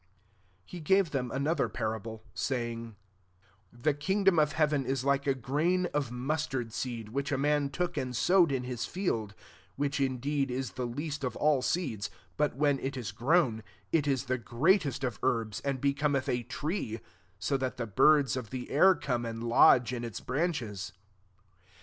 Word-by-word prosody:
" - - -37 0.6
SI 180 - -9
He - - -6
gave 190 +2 +3
them 125 -3 -1
another 140 +4 0
parable, 110 -1 -4
saying, 115 -3 -3 0.4
" 95 +1 -35
The 150 - +4
king 190 +8 -1
dom 190 -4 +5
of 150 -1 +2
heaven 150 -3 +2
is 130 0 -2
like 140 0 +1
a 135 - +3
grain 155 +9 0
of 145 -4 -1
mustard 130 -2 -2
seed, 115 -4 -4
which 140 +5 -2
a 140 - +1
man 145 0 +1
took 175 +5 -2
and 125 -1 -2
sowed 175 +3 +4
in 130 -2 -1
his 125 -2 -4
field: 115 - -2
32 - - -24 0.3
which 140 0 -1
indeed 135 +1 0
is 125 -3 -3
the 125 +5 -3
least 145 +4 -4
of 125 -3 -2
all 150 -3 +3
seeds: 125 - -1 0.3
but, 150 -3 0
when 145 0 +2
it 135 0 -4
is 115 -6 -4
grown, 120 - +2 0.3
it 155 -3 +2
is 135 -3 +1
the 130 0 -1
greatest 140 - +1
of 125 -5 -2
herbs, 110 -4 0
and 140 -2 -2
be 140 +2 +2
cometh 140 -1 0
a 120 - 0
tree; 125 - -3 0.4
so 100 +8 -1
that 130 -1 -2
the 120 - -2
birds 135 +5 +4
of 125 -4 -5
the 130 -1 -6
air 185 +6 +6
come 120 -3 -2
and 115 0 -5
lodge 120 +1 +5
in 120 -1 -3
its 115 -4 -5
branches." 120 - -2
135 Hz, 185 wpm, -30 LUFS, 120-150 Hz, 0.6 s, air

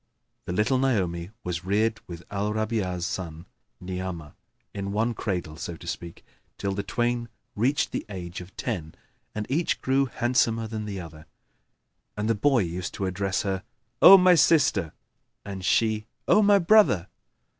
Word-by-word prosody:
The - - -4
little 110 +8 +1
Naomi 95 -10 0
was 90 -3 -3
reared 105 +3 +1
with 85 -1 -8
Al 105 +1 -1
Rabi'a's 105 -5 -1
son 85 -3 -5 0.3
Ni'amah 90 -4 -5 0.4
in 100 0 -4
one 115 +3 +1
cradle, 90 -8 -3
so 85 - -5
to - - -13
speak, 85 0 -7 0.3
till 100 - -2
the 100 - -2
twain 120 +2 -1 0.3
reached 130 +7 +1
the - - -3
age 90 -3 -6
of 90 +2 -13
ten 85 -10 -4 0.4
and 105 0 -3
each 160 +6 0
grew 135 +1 +1
handsomer 115 -2 +1
than 110 -1 -5
the 100 -2 -5
other; 80 -2 -10 0.9
and 105 +1 -1
the 115 - +3
boy 120 +2 +2
used 90 +1 -5
to 100 - -2
address 95 +1 -1
her, 95 -2 -2 0.4
"O 195 - +11
my 185 -1 +6
sister!" 145 - +3 0.5
and 95 -2 -6
she, 110 +2 +1 0.2
"O 215 - +5
my 205 -1 +6
brother!" 185 - +4
100 Hz, 155 wpm, -26 LUFS, 90-120 Hz, 0.9 s, O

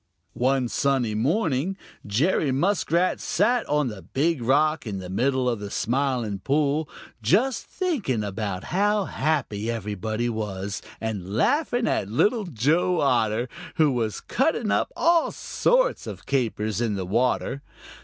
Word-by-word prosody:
One 130 0 +1
sunny 130 -3 +1
morning 155 - 0 0.3
Jerry 140 - +2
Muskrat 175 +3 +1
sat 235 +6 +1
on 150 -2 +2
the 105 -5 -6
Big 140 - 0
Rock 150 +3 +2
in 100 -2 -3
the 90 -1 -7
middle 130 +5 +1
of 120 -3 0
the 105 -1 -6
Smiling 120 -4 -1
Pool, 145 - +1 0.3
just 225 - +2
thinking 230 - -1
of 100 0 -5
how 185 - 0
happy 120 -12 -1
everybody 110 +1 -2
was 105 -3 -3 0.2
and 105 -3 -4
laughing 245 - +2
at 100 - 0
Little 210 - +2
Joe 165 - +1
Otter, 120 -3 +2 0.3
who 155 -3 +4
was 115 -4 -2
cutting 250 -6 0
up - - +1
all 335 0 +3
sorts - - +1
of - - -8
capers 110 -5 -1
in 110 -3 0
the 95 -2 -3
water. 125 +6 0
130 Hz, 135 wpm, -25 LUFS, 110-170 Hz, 0.3 s, who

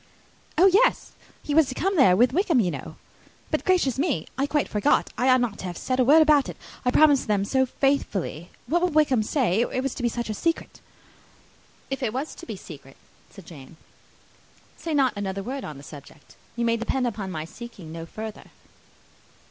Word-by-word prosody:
"Oh, 355 - +6
yes! 405 +6 +3 0.3
he 295 - -3
was 310 -2 +4
to 255 - -5
come 385 +7 0
there 260 - +6
with 245 +3 +4
Wickham, 335 -5 +2
you 185 -6 +1
know. - - -7 0.6
But, - - 0
gracious 315 -9 +1
me! 280 - 0
I 275 +2 0
quite 295 0 0
forgot! 215 +8 +1
I 255 - +1
ought 255 -1 +5
not 235 -4 -2
to - - -6
have 175 -1 -5
said 255 0 -2
a - - +5
word 305 +5 +6
about 300 -3 +3
it. - - -8 0.3
I 250 - +2
promised 290 +1 +4
them 205 -2 +1
so 260 +4 +1
faithfully! 205 - -1 0.2
What 335 +8 +1
will 360 - +2
Wickham 295 -7 +3
say? 220 - +1
It 255 +1 -1
was 270 - -2
to - - -7
be 240 - +1
such 235 +1 -4
a 215 - -3
secret!" 330 +10 -3 1.1
"If 270 - -3
it 230 -4 -1
was 270 +5 -4
to - - -12
be 220 - -5
a - - -11
secret," 145 -7 -12 0.3
said 195 - -14
Jane, 155 -1 -13 1.0
"say 325 -2 -4
not 265 -5 +3
another 195 -1 -4
word 265 +5 -5
on 150 -2 -7
the 140 - -12
subject. 145 0 -14 0.2
You 235 0 -1
may 230 0 +2
depend 250 +3 -1
upon 205 -5 -3
my 155 -3 -5
seeking 195 -3 -11
no 165 0 -7
further." 215 +3 -8
245 Hz, 205 wpm, -25 LUFS, 195-285 Hz, 1.1 s, Oh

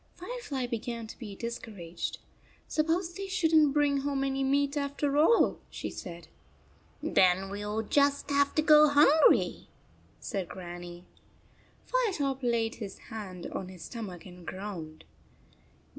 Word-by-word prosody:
Fire 485 +8 -6
fly 275 - -3
began 235 -1 -4
to 220 - -11
be 210 -5 -7
discouraged. 205 -7 -5 0.3
" - - -31
Suppose 330 +3 0
they 390 +2 -5
should 345 -4 +1
n 310 -1 +7
t - - 0
bring 290 -1 +2
home 275 0 -1
any 270 0 0
meat 280 +1 +1
after 280 0 -1
all," 325 +10 +4
she - - -5
said. 170 -2 -8 0.8
"Then 190 +1 +3
we 205 +1 -5
ll 210 +2 -2
just 285 +3 +2
have 280 0 +2
to 310 - +3
go 305 -1 +8
hungry," 295 +2 +4 0.5
said 195 -6 -4
Grannie. 175 -1 -8 0.8
Firetop 340 - 0
laid 235 -2 +1
his 200 -2 -6 0.2
hand 190 -5 -7
on 185 - -5
his 180 -3 -10
stomach 195 -5 -7
and 180 -1 -12
groaned. 175 -5 -7
255 Hz, 145 wpm, -30 LUFS, 190-290 Hz, 0.8 s, go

